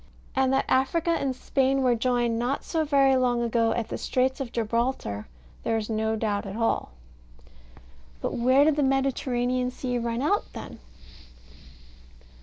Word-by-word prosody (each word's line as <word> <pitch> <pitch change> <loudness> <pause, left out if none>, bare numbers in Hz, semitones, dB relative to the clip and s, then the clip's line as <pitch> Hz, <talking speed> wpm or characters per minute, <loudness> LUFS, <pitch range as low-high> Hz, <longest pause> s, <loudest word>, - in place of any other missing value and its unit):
And 265 -1 +2
that 270 - +2
Africa 315 +6 +1
and 275 -5 0
Spain 270 +1 +1
were 250 -1 +4
joined 240 -1 0
not 250 +4 -1
so 320 -2 -1
very 275 -3 +4
long 245 -2 +1
ago 230 -1 +1
at 230 -2 -3
the - - -4
Straits 260 +1 0
of 260 -4 -4
Gibraltar 230 - -2 0.3
there 225 - 0
is 220 0 -4
no 220 0 0
doubt 210 -2 -2
at 195 - -6
all. 225 - 0 1.3
But - - -3
where 260 +4 +4
did 310 -1 +2
the - - +2
Mediterranean 255 -2 0
Sea 250 -1 -3
run 235 +2 -2
out 405 +8 0
then? - - -8
250 Hz, 155 wpm, -26 LUFS, 230-270 Hz, 1.3 s, were